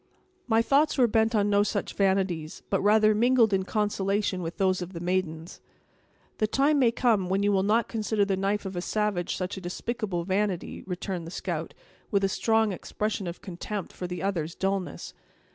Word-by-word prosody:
"My 225 -1 +3
thoughts 285 +6 +3
were 255 - +6
bent 225 0 +2
on 205 -1 +3
no 205 0 +4
such 205 0 -1
vanities, 190 -5 0
but 195 - +2
rather 215 +1 +5
mingled 230 0 +4
in 190 - +3
consolation 200 -2 0
with 165 0 -5
those 185 -1 +1
of 180 +2 -6
the 170 - -5
maidens." 175 -2 -2 0.8
"The 215 - +2
time 280 +6 +2
may 250 -3 +5
come 225 -6 +1
when 195 +2 +1
you 205 - +3
will 195 -1 +3
not 215 +4 +2
consider 215 -2 0
the 195 -1 0
knife 200 +2 -1
of 190 -1 -5
a 175 - -2
savage 210 -3 -1
such 185 +2 -4
a - - -6
despicable 190 0 -3
vanity," 190 0 -1
returned 180 -2 -4
the - - -6
scout, - - -4 0.3
with 200 -2 +1
a 195 - +3
strong 220 +1 +2
expression 205 +1 -3
of 170 - -6
contempt 195 +1 -5
for 180 - -5
the 180 +1 -5
other's 170 -4 -2
dullness. 190 -4 -3
200 Hz, 190 wpm, -27 LUFS, 185-215 Hz, 0.8 s, were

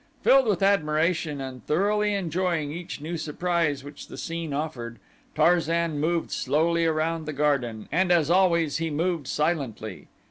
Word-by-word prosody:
Filled 270 -2 +5
with 200 -3 +1
admiration 160 -4 +1
and 130 -1 -7
thoroughly 205 +5 +1
enjoying 170 -4 -1
each 170 -2 -7
new 165 +3 -4
surprise 155 -2 -1
which 145 0 -10
the - - -10
scene 165 -2 -4
offered, 135 -6 -4 0.4
Tarzan 165 -1 +2
moved 165 +2 0
slowly 165 +5 +1
around 160 0 -1
the 155 - -3
garden, 135 -7 0
and 180 +4 +2
as 165 -3 +3
always 170 -5 +3
he 165 0 -2
moved 160 -1 -1
silently. 140 - -2
160 Hz, 145 wpm, -26 LUFS, 145-175 Hz, 0.4 s, Filled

